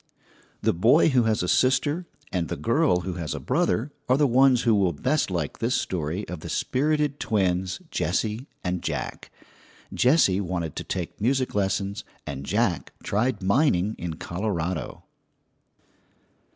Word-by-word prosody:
The - - +3
boy 120 - +5
who 125 -5 +3
has 110 -4 +1
a - - -1
sister 145 - +2 0.2
and 90 -3 -1
the - - -3
girl 90 0 +2
who 90 +1 -4
has 75 -4 -3
a - - -4
brother 115 +11 0 0.2
are 130 - +5
the 145 - +4
ones 130 -1 +4
who 115 - +4
will 95 -4 +2
best 150 - 0
like 85 -5 -3
this 120 +3 +1
story 90 +3 -2
of 90 -2 -6
the - - -8
spirited 150 +1 0
twins, 95 -3 0
Jessie 110 +5 -1 0.2
and 90 -1 -2
Jack. 75 -6 -4 0.6
Jessie 125 - +4
wanted 85 -5 -3
to - - -3
take 90 +1 -5
music 130 +3 +1
lessons 100 0 -1 0.2
and 70 0 -6
Jack - - 0
tried 105 0 0
mining 100 - +2
in 85 -2 -4
Colorado. 85 -1 -3
100 Hz, 150 wpm, -25 LUFS, 90-130 Hz, 0.6 s, boy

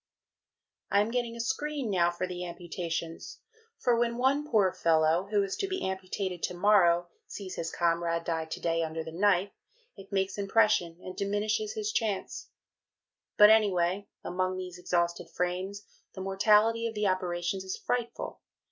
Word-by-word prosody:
I 200 - +4
am 215 +2 -1
getting 240 -1 -1
a - - -9
Screen 280 0 -2
now 175 -3 +3
for 175 +1 -3
the 180 -1 -5
amputations, 170 -1 -5 0.4
for 245 - +2
when 235 0 0
one 280 +4 +1
poor 200 -5 +3
fellow, 165 +2 +2
who 205 -1 +2
is 195 0 -3
to 390 - -1
be 375 - -2
amputated 190 -1 -3
to 180 - -2
morrow 175 -3 +4 0.2
sees 190 -3 -7
his 165 - -3
comrade 170 -1 0
to 160 -1 -3
day 165 -1 0
die - - +1
under 160 0 -3
the 160 - -8
knife, 195 +2 +2 0.4
it 195 0 -13
makes 195 +1 -1
impression 195 -4 +2
and 185 - -7
diminishes 210 - -1
his 430 -2 -2
chance. 215 - -2 0.9
But, 210 +1 +9
anyway, 200 -2 +2 0.2
among 185 +1 -1
these 180 -1 -7
exhausted 170 -1 -1
Frames, 185 +3 -3 0.3
the 190 - -6
mortality 210 +4 +3
of 225 - -6
the 210 0 0
operations 185 0 -1
is 190 0 -4
frightful. 240 -1 -3
190 Hz, 160 wpm, -29 LUFS, 175-215 Hz, 0.9 s, But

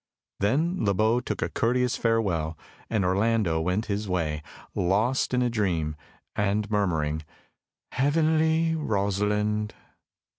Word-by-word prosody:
Then 155 - +1
Le 100 -2 +2
Beau 110 +4 +3
took 125 - -3
a - - -2
courteous 125 +2 +1
farewell, 90 -9 0 0.3
and 105 -4 +1
Orlando 100 -3 +2
went 90 +6 0
his 100 0 -3
way, 80 -4 -1 0.3
lost 105 +8 +1
in 125 0 +2
a - - +2
dream, 85 -9 0 0.4
and 105 +1 0
murmuring 80 -7 0 0.7
"Heavenly 160 +3 +2
Rosalind!" 105 -4 0
105 Hz, 115 wpm, -26 LUFS, 90-125 Hz, 0.7 s, Beau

